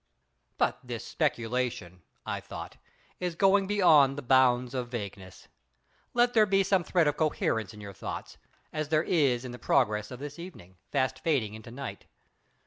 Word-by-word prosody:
But - - +1
this - - -6
speculation—I 115 -7 -3
thought—is 180 -2 -8
going 195 +2 +4
beyond 155 -9 +5
the 145 - -5
bounds 125 -1 +3
of 125 -2 -2
vagueness. 100 -6 -7 0.7
Let 245 0 +4
there 215 -2 +5
be 195 0 +3
some 190 -1 +2
thread 170 -2 +2
of 145 - 0
coherence 115 -8 0
in 105 -1 -12
your 100 -1 -8
thoughts, - - -7 0.3
as 155 -1 -2
there 155 0 +3
is 135 -9 +2
in 125 - -6
the 125 - -9
progress 105 -5 +1
of 125 - -7
this 145 +4 -8
evening, 95 - -11
fast 130 0 0
fading 130 -8 0
into 110 +2 -10
night. 135 +3 -7
130 Hz, 155 wpm, -29 LUFS, 115-165 Hz, 0.7 s, beyond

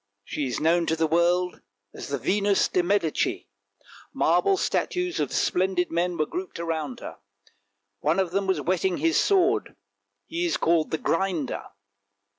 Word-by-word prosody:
She 145 -3 -3
is 125 - -3
known 170 +2 +2
to 160 - +1
the 160 0 +1
world 175 +3 +1 0.3
as - - -8
the 140 - -2
Venus 200 - +2
de 180 - +1
Medici. 175 -3 0 0.6
Marble 395 -1 +2
statues 360 -1 -1
of - - -1
splendid 185 -1 +1
men 175 +1 0
were 155 - +1
grouped 365 - -6
around 160 -5 -3
her; - - -8 0.8
one 155 +4 +1
of 185 -3 0
them 195 +1 -1
was 190 - +1
whetting 185 0 0
his 330 0 +2
sword, 400 +1 +2 0.5
he 335 +2 -3
is 345 - +1
called 165 -1 +2
the 160 - -1
Grinder. 165 -4 -1
180 Hz, 155 wpm, -25 LUFS, 165-200 Hz, 0.8 s, known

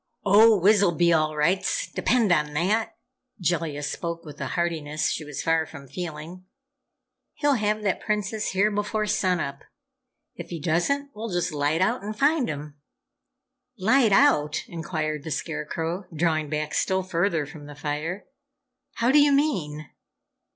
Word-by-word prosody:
"Oh, 215 +2 +7
Wiz'll 195 -2 +4
be 170 0 +4
all 155 -1 +1
rights 185 - +1
depend 235 -6 +1
on 150 -3 +2
that!" 205 +8 0 0.4
Jellia 165 -4 -1
spoke 170 +3 -4
with 150 -2 -10
a - - -2
heartiness 155 -3 -1
she - - -3
was 150 -3 -6
far 165 -1 +1
from 145 -3 -11
feeling. 170 +3 -7 0.9
"He'll 290 -1 +2
have 215 -3 0
that 195 -3 0
Princess 210 0 -2
here 200 +3 +2
before 210 +1 -1
sun 185 -3 +1
up. 140 -2 -5 0.7
If 170 -1 -9
he 170 - -5
doesn't, 230 - 0
we'll 225 +2 -6
just 175 -1 -1
light 150 +3 0
out 220 +7 +1
and 210 +2 -6
find 285 -1 +2
him!" 145 -1 -7 1.0
"Light 225 +4 +3
out?" 195 - +3
inquired 155 -3 -3
the 160 - -6
Scarecrow, 165 +5 -3
drawing 155 -2 0
back 150 0 -3
still 190 +3 +1
further 170 -3 0
from 145 +1 -11
the 145 - -10
fire. 150 +6 -4 0.7
"How 235 +2 +1
do 295 - +6
you 290 0 +5
mean?" 180 - 0
175 Hz, 150 wpm, -25 LUFS, 155-210 Hz, 1.0 s, Oh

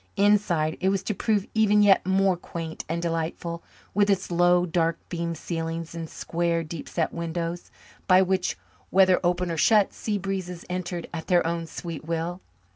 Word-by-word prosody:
Inside, 195 -6 +2
it 190 - +3
was 195 0 0
to 215 - -1
prove 205 -1 0
even 210 -1 +4
yet 200 -2 +5
more 190 0 +3
quaint 165 -2 -6
and 170 +1 -2
delightful, 170 0 -3 0.3
with 205 +1 +3
its 195 -2 +1
low, 175 +1 +4
dark 165 -1 +1
beamed 170 -1 -3
ceilings 165 0 -4
and 165 -1 -6
square, 170 0 -1
deep 160 -1 -7
set 165 - -1
windows 170 +1 -4 0.4
by 185 -1 +6
which, 190 -1 0 0.3
whether 185 -1 +5
open 175 0 +1
or 165 - -3
shut, 210 +3 +4
sea 210 -2 -2
breezes 185 -3 -4
entered 180 -1 -3
at 160 -1 -5
their 175 -2 +3
own 165 0 -2
sweet 165 -2 -6
will. 165 +3 -3
175 Hz, 170 wpm, -26 LUFS, 165-190 Hz, 0.4 s, by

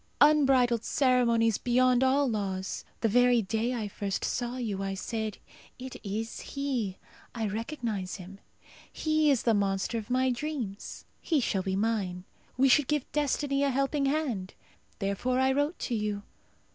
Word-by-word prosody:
Unbridled 265 -6 +5
ceremonies 235 -5 +3
beyond 250 +1 +3
all 270 +2 +3
laws! 195 -4 -3 0.2
The 225 - +3
very 245 +1 +4
day 225 +5 -1
I 220 -3 -2
first 200 -1 -3
saw 245 0 -2
you 210 -6 -3
I 195 0 -2
said, 220 +1 -3 0.4
'It 260 0 -8
is 220 +2 -4
he!' 255 -9 -3 0.4
I 225 -2 -1
recognize 220 -3 -3
him. 195 +1 -10 0.5
He 310 -1 +2
is 270 -5 +2
the 230 - +3
monster 200 +2 0
of 220 - -10
my 255 +1 +2
dreams. 245 -6 -5 0.2
He 320 -4 +1
shall 205 -6 0
be 190 0 -2
mine. 195 -4 -1 0.3
We 270 +1 +5
should 270 +1 +5
give 300 -3 -1
destiny 285 -1 0
a 280 - +3
helping 275 +1 +1
hand. 265 -11 -1 0.4
Therefore 200 +6 -1
I 265 0 +3
wrote 290 +5 0
to 245 - -3
you. 210 -2 -2
240 Hz, 155 wpm, -29 LUFS, 205-270 Hz, 0.5 s, Unbridled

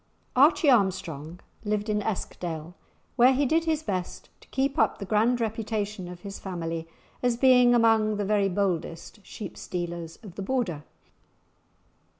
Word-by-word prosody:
Archie 290 +4 +5
Armstrong 180 - 0 0.2
lived 210 0 -1
in 210 -1 0
Eskdale, 175 -5 -4 0.4
where 250 +2 +6
he 280 +2 +2
did 325 +5 +2
his 315 -1 0
best 185 - -4
to - - -20
keep 275 +2 -1
up - - +3
the 200 - -6
grand 225 +5 +2
reputation 215 -3 -3
of 175 0 -9
his 200 -1 -7
family 165 -3 -4 0.3
as 245 -2 +1
being 250 -1 +6
among 220 -2 +3
the 205 - -1
very 200 -1 +2
boldest 185 +1 -2
sheep 205 -2 -8
stealers 170 -2 -5
of 200 -5 -10
the 200 - -6
Border. 190 - -2
210 Hz, 150 wpm, -27 LUFS, 180-240 Hz, 0.4 s, where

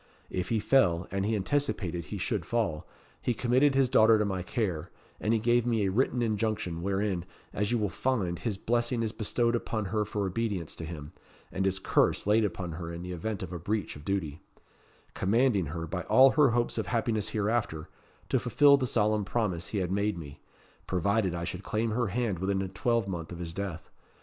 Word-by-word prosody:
If 90 -1 -2
he 115 - +2
fell, 95 -7 +3
and 95 +1 -1
he 110 - +1
anticipated 95 - -1
he - - -5
should - - -1
fall, 105 -10 -1 0.3
he 120 - 0
committed 130 +4 +3
his 135 -1 +4
daughter 115 -3 +6
to 105 - +1
my 95 -2 -2
care; 90 -4 -2 0.3
and 105 - 0
he 115 - +3
gave 120 +2 +3
me 115 -3 +1
a 95 - +1
written 125 +3 +1
injunction, 105 -6 -1
wherein, 95 -1 -1 0.3
as 105 +2 -1
you 120 - +2
will 105 -2 +1
find, 95 -8 -1
his 110 -5 -2
blessing 120 +2 0
is 110 - -1
bestowed 115 +2 0
upon 110 -2 -2
her 105 -1 +2
for 105 -1 -2
obedience 95 -4 -2
to 80 - -5
him, 80 -2 -8 0.4
and 95 - -1
his 95 -1 +1
curse 95 - +2
laid 105 +2 +4
upon 90 -3 -3
her 85 +1 -6
in 85 +1 -6
the 90 - -6
event 95 +4 -3
of 90 -1 -6
a 90 - -4
breach 100 +4 -2
of 75 - -11
duty; 80 -4 -2 0.7
commanding 105 - +2
her, 80 +3 -4
by 90 +3 -3
all 130 +1 +7
her 145 -1 +5
hopes 120 0 0
of - - -2
happiness 115 -3 0
hereafter, 105 -7 -1 0.4
to - - +2
fulfil 145 -1 +5
the 130 -2 -1
solemn 105 -2 +2
promise 95 -5 -1
he 105 - -4
had 90 -2 -1
made 100 0 0
me 75 -3 -9 0.5
provided 95 +1 +1
I 85 - -3
should 85 - -4
claim 110 +1 -1
her 120 +1 0
hand 105 -2 -1
within 95 +1 0
a - - -3
twelvemonth 95 -8 -1
of 85 - -6
his 85 -1 -6
death. 95 -3 -5
105 Hz, 205 wpm, -29 LUFS, 90-115 Hz, 0.7 s, all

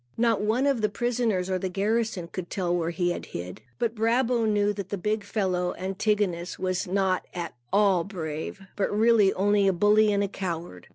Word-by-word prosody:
Not 230 -3 +2
one 225 +6 +1
of 275 -5 +2
the 210 - +2
prisoners 225 -4 0
or 185 -1 -1
the 190 - -2
garrison 205 -1 -1
could 175 0 -6
tell 175 -2 -1
where 170 -1 0
he 175 +1 0
had - - -5
hid. 90 +1 -7 0.2
But 230 -2 0
Brabo 230 +1 +1
knew 205 -1 +2
that 200 -2 -6
the 200 - -2
big 210 +3 -1
fellow, 185 -4 -1
Antigonus, 190 -2 -1
was 185 +1 -1
not 190 0 0
at 175 -1 -4 0.2
all 195 -4 +4
brave, 165 -1 -5
but 200 - 0
really 215 -1 +4
only 200 +1 +3
a 195 - +4
bully 210 +3 +4
and 200 0 +2
a - - 0
coward. 170 - -5
200 Hz, 190 wpm, -26 LUFS, 180-215 Hz, 0.2 s, all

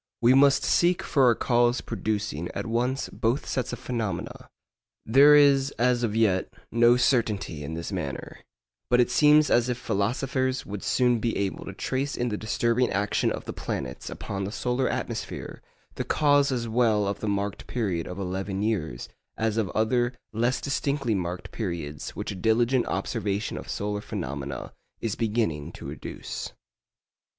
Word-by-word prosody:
We 120 +2 +5
must 140 +1 +5
seek 175 +1 +3
for 135 -5 +4
a 115 - +4
cause 120 0 +2
producing 105 -6 -3
at - - -3
once 125 +4 0
both 115 +5 -1
sets 125 -2 -2
of - - -4
phenomena. 115 -5 -4 0.6
There 140 +6 +7
is 140 -2 +5
as 125 0 +2
yet 110 -4 +1 0.2
no 120 +1 +5
certainty 110 - +1
in 80 +3 -5
this 85 +4 -5
matter, 85 -8 -5 0.5
but 125 - +4
it 125 0 +3
seems 150 +3 +5
as 120 +1 +3
if 125 - -1
philosophers 130 +5 -1
would 100 -1 -6
soon 125 -2 +2
be 115 +1 -1
able 100 -1 -2
to 100 - -6
trace 135 +8 -2
in 120 0 -1
the 105 - -2
disturbing 115 +3 +1
action 100 +1 0
of - - -5
the - - -5
planets 65 -3 -5
upon 100 -1 -5
the 100 - -3
solar 125 +3 0
atmosphere - - -4 0.3
the - - -3
cause 145 -2 +3
as 120 -2 -1
well 110 -3 +2
of 100 0 -2
the 110 - -3
marked 100 0 -2
period 95 -9 -2
of 90 - -6
eleven 95 +1 -3
years 80 - -2 0.3
as 110 -1 0
of 110 -4 0
other 120 +3 +1 0.2
less 120 +4 +1
distinctly 140 -3 -1
marked 90 -2 -3
periods 85 -8 -5
which - - -4
a - - -5
diligent 115 +6 +2
observation 100 +2 -2
of - - -7
solar 105 0 -2
phenomena 70 -5 -5 0.3
is 115 -3 -2
beginning 110 -10 -1
to - - -8
educe. - - -6
115 Hz, 160 wpm, -26 LUFS, 100-125 Hz, 0.6 s, There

